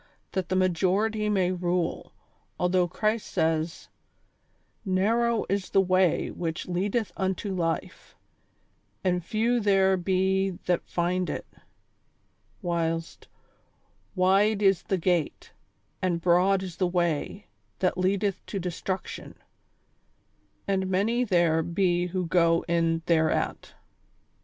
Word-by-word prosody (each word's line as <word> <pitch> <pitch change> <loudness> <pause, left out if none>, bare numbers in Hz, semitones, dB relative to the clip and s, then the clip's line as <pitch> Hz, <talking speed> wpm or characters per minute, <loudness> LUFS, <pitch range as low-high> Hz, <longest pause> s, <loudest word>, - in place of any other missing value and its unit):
That 185 -3 -3
the 185 - 0
majority 190 +4 +1
may 190 -3 +2
rule, 180 -1 -2 0.5
although 180 0 +2
Christ 215 +5 -1
says: 160 +1 -1 0.5
" - - -43
Narrow 225 +4 +1
is 195 -1 -2
the - - +3
way 185 -2 +2
which 165 -2 -4
leadeth 195 +3 -1
unto 190 +1 -2
life, 165 -3 -3 0.9
and 180 -1 +1
few 230 +6 +1
there 195 -3 +3
be 190 0 0
that 175 -1 +1
find 180 +1 0
it; - - -4 0.6
" - - -40
Avhilst, 165 -1 -2 0.5
" - - -40
Wide 200 +3 +3
is 195 -3 +4
the 190 - -1
gate, 175 -2 -1 0.5
and 180 -2 0
broad 185 +3 +3
is 180 -3 -7
the 185 - +1
way, 175 +2 -1 0.3
that 185 -1 +1
leadeth 195 +2 0
to 200 - -4
destruction, 185 +1 -5 1.3
and 190 -1 0
many 220 +6 +1
there 170 -7 +2
be 175 +1 0
who 180 0 -2
go 165 0 +2
in 165 -1 +1
thereat." 160 -2 0
185 Hz, 120 wpm, -27 LUFS, 175-195 Hz, 1.3 s, is